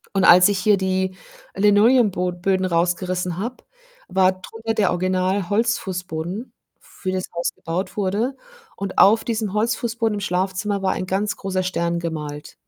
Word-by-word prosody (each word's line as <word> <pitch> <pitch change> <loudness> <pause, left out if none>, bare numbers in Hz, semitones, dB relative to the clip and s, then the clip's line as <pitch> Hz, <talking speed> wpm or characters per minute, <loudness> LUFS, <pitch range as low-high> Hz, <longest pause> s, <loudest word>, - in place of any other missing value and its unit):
Und 195 - +2
als 180 0 +8
ich 205 -1 0
hier 210 +1 +3
die 190 0 -1 0.4
Linoleumbo 205 -2 +4
Böden 185 +2 0
rausgerissen 180 0 -1
habe, 235 +6 -5 0.4
war 190 -1 +3
drunter 225 +4 -5
der 205 -4 +2
Original 185 +1 0
Holzfußboden, 190 -2 -2 0.3
für 185 - -6
das 185 0 -2
Haus 170 0 -1
gebaut 175 +6 -4
wurde 210 +7 -1 0.4
und 195 -1 -5
auf 220 +3 +6
diesem 220 -3 -2
Holzfußboden 225 +1 0
im - - -3
Schlafzimmer 190 +2 -1
war 190 -1 +1
ein 185 - -3
ganz 195 +3 -1
großer 190 -1 -2
Stern 170 -2 -1
gemalt. 150 -3 -6
190 Hz, 145 wpm, -22 LUFS, 180-210 Hz, 0.4 s, als